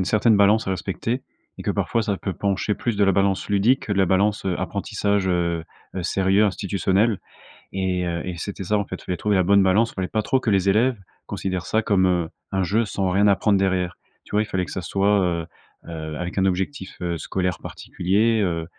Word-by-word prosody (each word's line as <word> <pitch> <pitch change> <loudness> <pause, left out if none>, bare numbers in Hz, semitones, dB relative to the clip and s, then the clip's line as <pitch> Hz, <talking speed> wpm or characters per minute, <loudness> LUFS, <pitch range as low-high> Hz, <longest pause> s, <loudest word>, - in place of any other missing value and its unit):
une 95 - +1
certaine 110 +2 +3
balance 105 +2 +4
à - - -1
respecter, 100 +7 -3 0.4
et - - -6
que - - -1
parfois 115 - 0
ça 105 -2 -1
peut 95 - -4
pencher 100 +2 -1
plus 120 -3 -2
de 100 - +4
la 95 - +3
balance 100 +1 +1
ludique 105 +6 +2
que 105 - -1
de 100 - -1
la 95 - +4
balance, 100 +3 +1
heu, 90 -2 -1
apprentissage, 100 +1 -1
heu 85 -2 0 0.3
heu, 95 - -3
sérieux, 95 +3 +2
institutionnel. 100 +1 +1 0.5
Et 95 -2 -1
heu, 85 -1 -2
et 90 -2 -4
c'était 100 +2 -5
ça 105 +3 +1
en 100 - -1
fait, - - -6
il - - -15
fallait 90 -1 -2
trouver 105 -2 +1
la 95 - +3
bonne 100 +2 +5
balance. 105 +5 +3
Il - - -22
fallait 95 -1 -2
pas 110 - -1
trop 130 +5 +1
que 115 - -1
les 100 -1 +3
élèves 115 +5 +3 0.3
considèrent 95 -2 -3
ça 110 - +1
comme, 95 -3 +2
heu, 90 -3 +1 0.2
un 95 0 0
jeu 110 +5 +1
sans 95 -1 -1
rien 100 +3 +3
apprendre 100 0 +3
derrière. 90 -2 0 0.3
Tu - - -7
vois? 105 - +3
Il - - -6
fallait 95 -3 -2
que - - -10
ça 95 - -3
soit, 100 +4 +2
heu 85 -2 -1 0.4
heu, 80 -2 -6
avec 90 +2 -5
un 95 - +3
objectif, 95 +3 -3
heu, 85 -1 -2
scolaire 90 +2 -2
particulier, 110 +5 0
heu. 85 -4 -1
95 Hz, 230 wpm, -23 LUFS, 90-105 Hz, 0.5 s, bonne